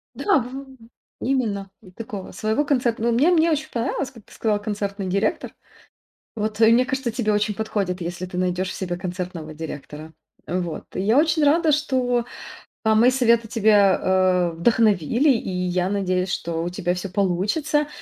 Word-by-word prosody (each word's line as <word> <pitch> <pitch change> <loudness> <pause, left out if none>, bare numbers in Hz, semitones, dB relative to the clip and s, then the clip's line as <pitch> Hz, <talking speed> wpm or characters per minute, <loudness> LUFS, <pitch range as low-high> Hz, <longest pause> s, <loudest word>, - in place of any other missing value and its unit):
Да, 405 -7 +2
в - - -6
в 270 -1 -9 0.5
именно, 215 -7 -1
и 195 - -15
такого 210 -1 -7
своего 220 +6 0
концертно 245 -6 0
Но 235 - +3
мне 275 +10 +3
мне 335 -1 +4
очень 310 0 -1
понравилось, 255 +3 -2
как 230 -6 -16
ты - - -18
сказала: 215 -2 0
концертный 200 -2 -4
директор. 200 +4 -1 0.8
Вот, 215 0 -3
э, 220 - +7
мне 245 +2 +4
кажется, 265 -1 -2
тебе 215 -2 0
очень 210 0 0
подходит, 200 -4 -2
если 175 +1 -4
ты 180 - -7
найдешь 185 0 -1
в - - -5
себе 175 -2 -3
концертного 180 -3 -5
директора. 155 0 -8 0.3
Э, 180 +2 -2
вот. 170 -4 -5
И - - -1
я 215 +6 +2
очень 315 +1 +3
рада, 315 +2 +4
что, 255 -5 +1 0.6
а, 220 0 +4
мои 235 +4 +5
советы 235 -3 +2
тебя, 210 -4 +4
а, 185 -2 +2
вдохновили, 220 - +2
и 230 -6 -1
я 180 0 -1
надеюсь, 185 -2 -1
что 165 -1 -2
у 175 - -2
тебя 180 -1 -2
всё 185 +2 -5
получится 205 - 0
210 Hz, 175 wpm, -23 LUFS, 185-245 Hz, 0.8 s, э